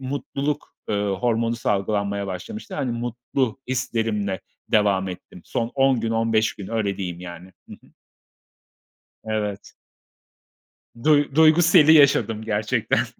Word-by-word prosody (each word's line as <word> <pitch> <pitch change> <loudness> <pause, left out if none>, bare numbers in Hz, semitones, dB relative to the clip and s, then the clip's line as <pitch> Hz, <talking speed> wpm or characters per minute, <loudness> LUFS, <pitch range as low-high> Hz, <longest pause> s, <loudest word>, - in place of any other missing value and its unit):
mutluluk, 140 +2 -4 0.2
ııı, 100 -1 0
hormonu 115 +1 0
salgılanmaya 100 -2 -1
başlamıştı. 140 - -7
Hani, 135 -6 -2
mutlu 120 +1 -2
hislerimle 110 -6 -1 0.3
devam 100 -3 +2
ettim 90 -1 -10
son 115 0 -2
10 135 -2 +3
gün, 115 0 -2
15 115 -1 +1
gün. 100 - -9
Öyle 110 -4 -1
diyeyim 90 -3 -5
yani. 90 +1 -10 0.2
Hı - - -11
hı. - - -24 1.3
Evet. 105 -2 -4 1.3
Duy 145 -2 +3
duygu 160 +2 +6
seli 160 -2 +6
yaşadım 130 -7 +4
gerçekten. 110 +1 0
115 Hz, 120 wpm, -23 LUFS, 100-130 Hz, 1.3 s, duygu